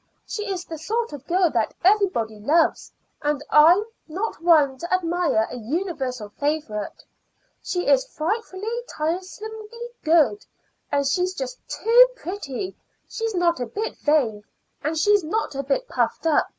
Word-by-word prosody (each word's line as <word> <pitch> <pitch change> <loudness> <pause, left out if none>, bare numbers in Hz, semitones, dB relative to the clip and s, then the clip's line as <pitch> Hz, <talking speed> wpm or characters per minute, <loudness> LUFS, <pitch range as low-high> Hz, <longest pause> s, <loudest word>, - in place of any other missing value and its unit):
She 420 -1 -4
is 360 -2 -4
the 320 -2 -7
sort 455 +5 -2
of 285 -2 -9
girl 355 -1 +3
that 225 -3 0
everybody 365 - +2
loves, 310 +10 +2 0.3
and 295 -1 -1
I 305 +3 +8
am 410 +4 -1 0.2
not 375 +4 -4
one 300 -6 +4
to 345 - -6
admire 345 -10 +1
a - - -5
universal 260 - -3
favorite. 285 -9 -2 0.6
She 360 -1 -2
is - - +3
frightfully, 430 +4 -3
tiresomely 425 +8 -5
good, 335 +5 +3 0.5
and 280 0 +1
she's 360 +7 0
just - - -5
too 480 +3 +6
pretty; 370 - -5
and - - -17 0.4
she's 450 -2 -2
not 345 -3 +2
a 245 - -2
bit 425 - -4
vain, 250 -9 +1 0.4
and 310 +3 -1
she's 410 +4 +4
not 340 +3 -2
a 275 - -2
bit 280 - -1
puffed - - -1
up. 320 -2 +3
340 Hz, 150 wpm, -23 LUFS, 290-415 Hz, 0.6 s, I